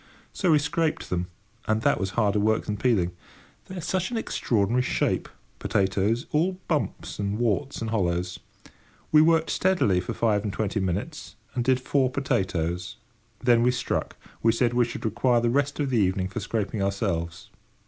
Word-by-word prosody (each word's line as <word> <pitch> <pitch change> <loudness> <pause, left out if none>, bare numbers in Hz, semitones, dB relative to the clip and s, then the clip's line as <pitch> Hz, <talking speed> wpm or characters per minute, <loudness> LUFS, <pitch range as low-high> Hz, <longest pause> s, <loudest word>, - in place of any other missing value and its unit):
So 185 - 0
we 155 - +6
scraped 155 +2 -1
them, 90 0 -1 0.4
and 110 0 +1
that - - +3
was 95 - -1
harder 105 -2 +2
work 110 +1 +1
than 105 - -2
peeling. 105 -6 +1 0.6
They 190 - -8
are - - -4
such 185 +3 -1
an 240 - -3
extraordinary 120 - +1
shape, - - 0 0.3
potatoes—all 115 - +1
bumps 150 -8 -2
and 100 0 -1
warts 120 +4 -1
and 110 -1 -3
hollows. 90 -4 -1 0.7
We 155 - +7
worked 165 0 +3
steadily 180 - +2
for 90 - -4
five 105 -3 +1
and 105 - -2
twenty 105 +1 -1
minutes, 100 - -3 0.2
and 125 -3 -1
did 130 +1 +3
four 130 0 +1
potatoes. 90 - -1 0.5
Then 120 -1 +5
we 120 - +4
struck. 125 - -2 0.3
We 115 0 +4
said 120 0 +1
we 120 0 +3
should 120 - -6
require 120 +2 +2
the 120 0 +1
rest 140 +3 0
of 140 -2 0
the 120 - +3
evening 95 -1 +1
for 120 - -4
scraping 105 -1 -2
ourselves. 95 -4 -2
115 Hz, 170 wpm, -26 LUFS, 100-130 Hz, 0.7 s, We